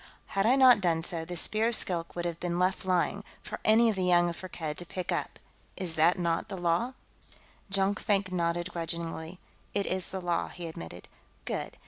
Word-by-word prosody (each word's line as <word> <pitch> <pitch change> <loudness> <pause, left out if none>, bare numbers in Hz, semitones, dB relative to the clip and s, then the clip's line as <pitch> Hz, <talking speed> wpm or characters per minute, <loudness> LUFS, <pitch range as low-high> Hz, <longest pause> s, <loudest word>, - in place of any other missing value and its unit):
Had 195 +1 +2
I 250 - +5
not 255 -5 +7
done 165 -3 +1
so, 165 -1 -1
the 175 +1 -4
Spear 215 +6 +3
of 235 - +1
Skilk 170 -5 0
would 175 0 -3
have 170 -1 -3
been 175 -1 -2
left 185 +1 +1
lying, 185 +2 +1 0.2
for 215 - -6
any 225 +2 +5
of 220 - +2
the 190 - -1
young 175 -1 +4
of 170 - -5
Firkked 165 -5 -6
to - - -5
pick 180 +1 -5
up. - - -2 0.4
Is 185 -4 0
that 160 +4 +4
not 170 +3 -1
the 195 - -5
law?" 175 +8 0 0.8
Jonkvank 195 0 +1
nodded 175 0 -1
grudgingly. 165 0 -4 0.4
"It 200 -1 +1
is 185 -1 -1
the 190 - -4
law," 175 -2 -1
he 175 -1 -7
admitted. 85 - -9 0.4
"Good. - - -4
180 Hz, 195 wpm, -29 LUFS, 170-195 Hz, 0.8 s, not